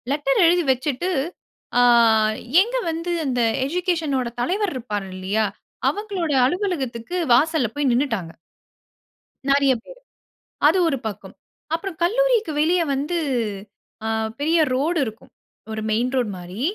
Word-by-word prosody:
Letter 280 -1 +1
எழுதி 350 +1 +4
வச்சிட்டு. 265 +6 -1 0.7
ஆ - - +6 0.8
எங்க 480 +5 -1
வந்து 335 +2 -3
அந்த 250 -3 0 0.2
எஜுகேஷனோட 320 -6 -1
தலைவர் 385 - 0
இருப்பாரு 210 -6 -4
இல்லயா? 195 +4 0 0.4
அவங்களோட 395 -6 -3
அலுவலகத்துக்கு 295 - -2 0.2
வாசல்ல 300 0 +3
போய் 290 -2 +1
நின்னுட்டாங்க. 235 - -1 1.2
நறைய 275 -1 +4
பேரு. - - -13 0.7
அது 325 +5 +4
ஒரு 275 - -1
பக்கம். 210 - -8 0.4
அப்புறம் 340 0 -6
கல்லூரிக்கு 460 0 +2
வெளியே 340 +3 +3
வந்து, 290 +6 -1 0.9
அ - - -1 0.3
பெரிய 320 +3 +2
ரோடு 310 +6 +1
இருக்கும். 220 -1 -9 0.4
ஒரு 220 - -4
மெயின் 240 +4 +1
ரோட் 245 -5 0
மாரி, 180 +5 -8
290 Hz, 120 wpm, -22 LUFS, 245-350 Hz, 1.2 s, ஆ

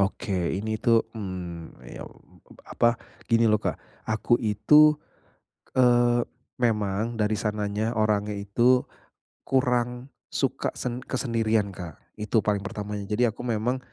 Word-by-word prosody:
Oke 95 -3 -1
ini 110 +2 -2
tuh 115 -1 +4
mmm 90 -5 -6
ya - - -8 0.6
ap - - -13
apa 120 - +6 0.4
gini 115 0 +4
loh, 105 -1 +3
Kak. - - -2 0.3
Aku 110 +2 +2
itu, 140 +8 +5 0.8
eee, 120 -1 +4 0.4
memang 110 0 0
dari 105 0 +1
sananya 105 +1 -1
orangnya 105 -1 +1
itu 120 +6 +2 0.6
kurang 125 -1 0 0.2
suka - - -1
sen 125 0 -3
kesendirian, 115 -5 0
Kak, 90 -3 -8 0.2
itu 110 +1 +1
paling 105 -1 +1
pertamanya. 105 -1 -5
Jadi 115 +3 +2
aku 110 - -6
memang 120 +2 0
110 Hz, 125 wpm, -26 LUFS, 105-120 Hz, 0.8 s, apa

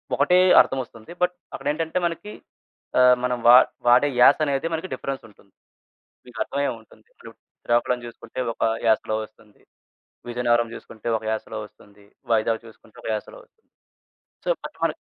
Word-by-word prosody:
ఒకటే 150 +6 +3 0.2
అర్థమొస్తుంది, 120 -3 -5
బట్ 180 0 +2 0.2
అక్కడేంటంటే, 160 +4 -2
మనకి 205 +5 -7 0.7
ఆహ్, 125 0 +7
మనం 125 -1 0
వా 120 - +10 0.3
వాడే 125 +4 +5
యాసనేది 140 +2 +4
మనకి 165 +3 -4
డిఫరెన్సుంటుంది. 115 -7 -8 0.7
మీకర్థమయ్యే 135 +3 -2
ఉంటుంది. 110 - -22
ఇప్పుడు - - -13 0.3
శ్రీకాకుళం 120 +1 +1
చూసుకుంటే 120 +2 -8
ఒక - - -11 0.2
యాసలో 110 -1 +2
వస్తుంది, 105 -1 -20 0.7
విజయనగరం 120 -1 +1
జూసుకుంటే 110 -1 -10
ఒక 110 - -12
యాసలో 110 0 -4
వస్తుంది, 105 0 -20 0.3
వైజాగ్ 115 +1 +1
చూసుకుంటే 110 -1 -18
ఒక - - -5
యాసలో. 105 - -8 1.1
సో, - - +1 0.2
అట్టె - - -15
మరి - - -3
120 Hz, 125 wpm, -23 LUFS, 110-140 Hz, 1.1 s, వా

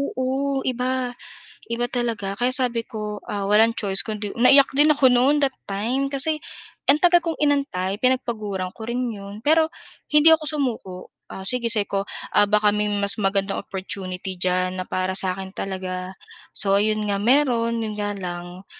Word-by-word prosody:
oo 270 0 -2
iba, 255 0 -1 0.6
iba 240 +1 0
talaga 230 -6 -3
kaya 245 +3 0
sabi 245 -3 +1
ko, 210 -2 -6
ah, 200 -1 -2
"Walang 225 +3 +3
choice 195 -2 +1
kundi" 210 -2 -5
Naiyak 275 +3 +6
din 300 +2 +5
ako 280 -3 +4
no'n 255 +4 +4
that 275 -2 0
time 240 +8 -2
kasi, 305 +3 +2 0.5
ang 280 - +6
tagal 350 +1 +4
kong 330 -2 -3
inantay 255 -10 0
pinagpaguran 215 -7 -1
ko - - -14
rin 245 -1 -2
'yon 200 +3 -10
pero 315 +1 +4 0.4
hindi 300 +2 +7
ako 320 -1 +1
sumuko, 250 -11 -3 0.3
ah, 190 - -8
sige 240 +2 +1
sabi 215 -3 +1
ko 195 0 -2 0.3
"Ah, 205 -1 +4
baka 210 -1 +3
may 210 0 0
mas 200 -1 +1
magandang 195 0 0
opportunity 190 -1 -6
diyan 185 0 0
na - - -9
para 185 0 -1
sa 185 -1 -1
akin 190 0 -7
talaga." 185 -1 -5 0.4
So 195 -1 +3
ayun 215 0 0
nga, 200 -1 -1
mayro'n 235 -2 +2
'yon 215 - -4
nga 205 -1 -3
lang, 175 0 -7
215 Hz, 170 wpm, -23 LUFS, 195-260 Hz, 0.6 s, hindi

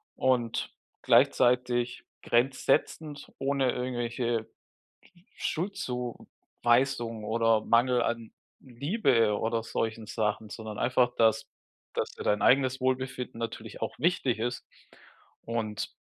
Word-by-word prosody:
und 125 -3 0 0.3
gleichzeitig 125 -1 +3 0.2
grenzsetzend, 135 +4 0
ohne 135 -2 +1
irgendwelche 120 -2 -2 0.9
Sch - - -2
Schuldzuweisung 125 - -1
oder 115 0 +2
Mangel 120 +1 +3
an 115 -2 -3 0.3
Liebe 130 - +1
oder 115 0 -1
solchen 110 -1 -3
Sachen, 105 0 -1
sondern 110 -2 -7
einfach, 125 0 +2
dass 135 +5 +3 0.5
dass - - -1
dir - - -8
dein 105 0 +1
eigenes 130 +2 +3
Wohlbefinden 130 -1 -2
natürlich 115 0 -6
auch - - -3
wichtig 155 -9 +1
ist 120 +2 -3 0.8
und 110 -2 -3
120 Hz, 100 wpm, -29 LUFS, 115-130 Hz, 0.9 s, gleichzeitig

